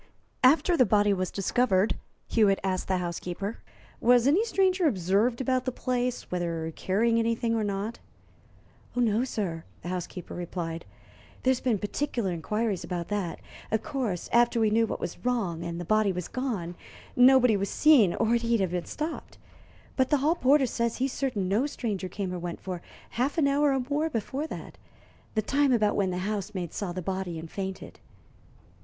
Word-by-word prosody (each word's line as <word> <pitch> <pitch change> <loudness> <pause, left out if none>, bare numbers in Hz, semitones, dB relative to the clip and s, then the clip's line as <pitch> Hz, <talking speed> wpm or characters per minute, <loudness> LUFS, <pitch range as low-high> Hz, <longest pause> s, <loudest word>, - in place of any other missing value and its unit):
"After 315 +7 +5
the 260 - +6
body 205 -2 +3
was 185 -1 -1
discovered," 200 0 +1 0.3
Hewitt 205 -4 +3
asked 185 -1 -1
the 190 - +1
housekeeper, 180 +4 -4 0.4
"was 245 0 +5
any 315 +10 +4
stranger 380 -5 +2
observed 205 - +1
about 255 -1 0
the 255 - 0
place 250 0 -2
whether 165 -2 -2
carrying 230 +5 +1
anything 230 0 0
or 225 -1 +1
not?" 205 +3 -3 1.0
"No, 235 -1 +2
sir," 185 -10 -3 0.2
the 175 - -5
housekeeper 180 -1 -5
replied. 170 -1 -5 0.6
"There's 260 -1 +3
been 245 -5 +1
particular 210 0 -2
inquiries 200 +3 -1
about 175 -1 -4
that. 200 -5 -3 0.3
Of 220 0 0
course, 240 - -2
after 235 0 +4
we 220 -2 +3
knew 225 +1 +3
what - - -4
was - - -6
wrong 200 -10 -1
and 170 0 -4
the 175 - -5
body 215 +2 +3
was 180 -2 -4
gone, 220 -10 -3 0.4
nobody 250 -2 +6
was 200 0 -1
seen, 260 - +5
or 225 0 +1
he'd 235 -1 +2
have 190 -3 0
been 175 -1 -2
stopped. 310 +2 -5 0.6
But 260 -1 +2
the 295 - +4
hall 295 +4 +2
porter 280 -3 +4
says 235 -1 -1
he's 265 +1 -1
certain 235 -9 -1
no 215 +9 +2
stranger 205 -9 -3
came 190 0 -4
or 180 - -4
went 175 0 -5
for 180 -2 -5 0.3
half 260 +6 -1
an 300 -4 +4
hour 285 +1 +3
or 265 -2 0
more 300 +3 0
before 265 +4 -3
that - - -8 0.6
the 215 - +1
time 280 +3 +2
about 215 -4 +3
when 195 -2 +1
the 180 - -2
housemaid 200 -4 -3
saw 200 -4 -3
the 180 0 -5
body 185 -2 -3
and 160 0 -8
fainted." 190 -1 -6
215 Hz, 175 wpm, -28 LUFS, 185-255 Hz, 1.0 s, the